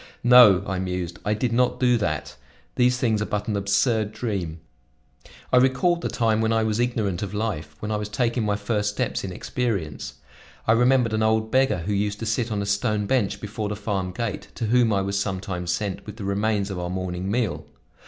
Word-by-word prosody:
"No," 120 -6 +8
I 95 -2 -2
mused, 90 -2 -3
"I 105 +1 0
did 115 +2 -1
not 125 +1 +2
do 125 -1 +4
that. 75 -8 -2 0.4
These 125 0 +3
things 110 -4 +1
are 105 - -1
but 105 0 -2
an 105 - -1
absurd 105 +2 +1
dream." 95 -9 -3 0.9
I - - +7
recalled 135 +7 +3
the - - -2
time 110 -2 +1
when 110 0 +1
I 115 0 +2
was 110 0 0
ignorant 110 -7 0
of 100 0 -4
life, 85 -9 -3
when 105 +7 -5
I 105 - 0
was 105 0 -4
taking 115 +2 0
my 105 -1 +1
first 105 0 -1
steps 105 - -2
in 95 - -4
experience. 100 -6 -3 0.5
I - - +5
remembered 120 0 +3
an 110 - +1
old 110 0 +1
beggar 130 -8 +2
who 105 - -1
used 105 +1 -1
to 115 - -5
sit 115 +1 -1
on 100 -1 -1
a - - -3
stone 100 +1 0
bench 105 -4 0
before 105 0 -4
the 105 - -3
farm 100 -3 -2
gate, 115 0 -4
to 115 - -2
whom 120 0 +3
I 100 -1 +2
was 100 0 -1
sometimes 95 -3 -3
sent 95 +3 -3
with 105 - -8
the 105 - -6
remains 100 0 0
of 95 - -4
our 90 0 -3
morning 90 0 -3
meal. 100 -10 -1
105 Hz, 210 wpm, -24 LUFS, 100-115 Hz, 0.9 s, No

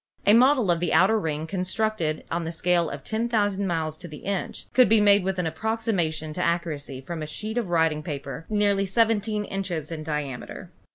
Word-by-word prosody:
A 205 - +6
model 250 -4 +5
of 170 - +1
the 175 - 0
outer 215 +4 +5
ring, 155 -4 -2
constructed 185 -2 -1
on 170 0 -1
the 165 - -3
scale 170 0 +1
of 140 -1 -7
10,000 215 -3 0
miles 160 -3 -1
to 175 - -9
the 150 -2 -11
inch, 195 -1 -3
could 255 -1 +6
be 220 0 +5
made 205 -1 +5
with 190 0 -1
an 180 - -1
approximation 165 -4 -1
to 180 - -3
accuracy 155 -6 -2
from 165 +4 -6
a 155 - -4
sheet 215 +8 -4
of 215 -7 -4
writing 160 -3 +2
paper 140 -1 -6
nearly 205 -2 +2
seventeen 215 0 +1
inches 175 -6 -4
in 160 -2 -4
diameter. 150 -5 -5
180 Hz, 190 wpm, -25 LUFS, 155-210 Hz, -, A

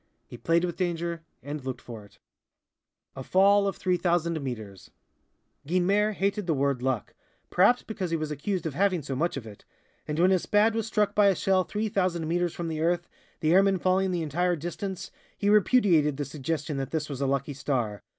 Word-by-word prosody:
He - - -11
played 165 +7 +1
with 175 - -5
danger, 170 -2 -2 0.2
and 145 0 -6
looked 130 -1 -4
for 115 -3 -10
it. 100 - -20 1.0
A 135 - -6
Fall 200 +5 +4
of 195 - -2
3,000 170 -3 0
Meters 110 -8 -7 0.8
Guynemer 195 +5 +2
hated 200 0 -1
the 160 - +2
word 140 -2 0
"luck," 130 -5 -2 0.4
perhaps 205 +7 +4
because 195 -5 -4
he 165 - 0
was 155 -1 -4
accused 175 +6 -3
of 160 - -2
having 185 0 +1
so 135 -1 -4
much 165 +3 -1
of 125 - -6
it, 105 -2 -12 0.4
and 150 - -3
when 180 +3 +4
his 185 -2 +3
Spad 210 +2 +3
was 225 -1 -2
struck 210 -2 +1
by 205 -1 +5
a 195 - +4
shell 190 0 +2
3,000 185 -6 -1
meters 175 +1 0
from 170 - -4
the 155 -1 -3
earth, 175 +1 0 0.3
the 155 +1 +3
airman 195 +1 +4
falling 185 +2 +1
the 175 -2 -1
entire 175 +4 0
distance, 180 +4 -5 0.3
he 205 0 +1
repudiated 185 - +4
the 145 - -2
suggestion 150 +1 -3
that 135 -1 -4
his 155 -1 -2
was 140 -2 -6
a 140 - +1
lucky 140 +1 -1
star! 125 -7 -2
170 Hz, 195 wpm, -27 LUFS, 145-190 Hz, 1.0 s, by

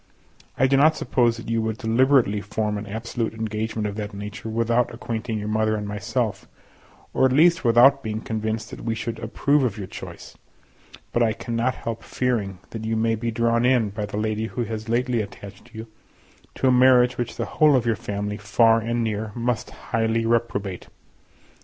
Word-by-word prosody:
I 135 - +4
do 135 +1 +3
not 155 +3 +5
suppose 120 -5 +1
that 115 - -9
you 115 0 0
would 110 -1 -2
deliberately 115 -2 +3
form 105 0 -2
an 105 - -8
absolute 110 +1 -3
engagement 110 0 -3
of 100 0 -6
that 105 -1 -5
nature 105 +3 -7
without 115 +2 +1
acquainting 115 -1 -4
your 105 0 -4
mother 110 0 +1
and 105 -1 -4
myself, 105 +2 -2 0.7
or - - +1
at 130 - +3
least, 165 +5 +4
without 125 +4 +6
being 110 -3 -3
convinced 110 0 -3
that - - -8
we 115 -1 -1
should 115 0 -4
approve 140 +5 +1
of 115 -4 -1
your 100 - -5
choice; - - -10 0.8
but 120 - +2
I 115 -2 +3
cannot 115 +1 -2
help 115 -1 -5
fearing 110 -7 -2
that 110 -1 -6
you 110 0 -1
may 115 0 +1
be 115 +1 -2
drawn 115 +1 +1
in, 125 -5 +3
by 105 0 -4
the 100 - -5
lady 110 +1 -1
who 120 +1 -3
has 110 0 -5
lately 120 0 +1
attached 100 +3 -10
you, 110 +1 -6 0.7
to 135 - +1
a - - +5
marriage 125 -1 +5
which 120 - -3
the - - -2
whole 150 -2 +4
of 125 -3 +1
your 115 -1 +2
family, 105 +1 -4
far 115 +2 +3
and 115 +1 -1
near, 110 -1 -2
must 120 0 -2
highly 115 0 -1
reprobate. 115 -5 -1
115 Hz, 190 wpm, -23 LUFS, 110-120 Hz, 0.8 s, without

